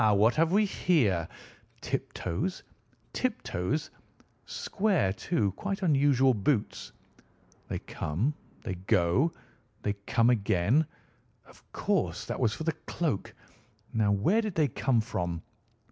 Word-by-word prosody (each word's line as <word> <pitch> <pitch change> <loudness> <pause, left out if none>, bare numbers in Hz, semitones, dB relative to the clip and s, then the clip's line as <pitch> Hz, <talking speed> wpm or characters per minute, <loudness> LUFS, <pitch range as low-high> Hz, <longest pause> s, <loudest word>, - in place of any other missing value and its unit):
What 110 +4 +5
have 165 +1 +3
we 210 +3 +4
here? 110 - +2 0.5
Tiptoes! 180 - -3 0.5
tiptoes! 255 -2 -2 0.6
Square, 190 - +1
too, 105 - 0
quite 195 - -4
unusual 140 -5 +4
boots! 105 +2 -1 0.8
They - - -2
come, 100 - -2 0.3
they - - -3
go, 95 - +2 0.5
they 105 - +1
come 115 +1 +4
again—of 115 - -2
course - - 0
that - - -4
was 110 - +3
for 160 - -5
the 160 - +1 0.2
cloak. 160 - -2 0.6
Now 110 -2 +2
where 165 - +3
did 215 -5 -4
they 155 -3 +3
come 120 0 +1
from?" 90 -6 -3
125 Hz, 115 wpm, -29 LUFS, 100-165 Hz, 0.8 s, What